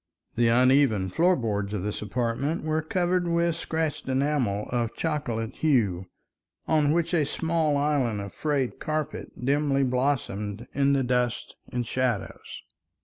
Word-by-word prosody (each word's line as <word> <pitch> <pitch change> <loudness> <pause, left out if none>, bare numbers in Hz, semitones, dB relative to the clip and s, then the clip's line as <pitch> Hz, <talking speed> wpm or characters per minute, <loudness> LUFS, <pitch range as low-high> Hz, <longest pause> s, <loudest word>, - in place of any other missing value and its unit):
The 120 0 +2
uneven 125 -4 +4
floor 175 - +3
boards 105 - -2
of 95 - -3
this 105 0 -3
apartment 120 - -1
were 155 0 0
covered 175 +2 0
with 170 0 +1
scratched 160 -3 -2
enamel 130 -7 0
of 120 -2 -1
chocolate 130 -8 -2
hue, 105 - +1 0.6
on 150 -2 +3
which 170 +1 0
a 165 -3 +4
small 160 0 0
island 140 -7 +1
of 100 -1 -6
frayed 145 -5 -1
carpet 155 -1 -3 0.2
dimly 140 0 +2
blossomed 125 -5 -1
in 140 0 +3
the 135 -1 +2
dust 125 -1 -1 0.2
and 120 -1 -2
shadows. 125 -3 -3
135 Hz, 140 wpm, -26 LUFS, 115-155 Hz, 0.6 s, uneven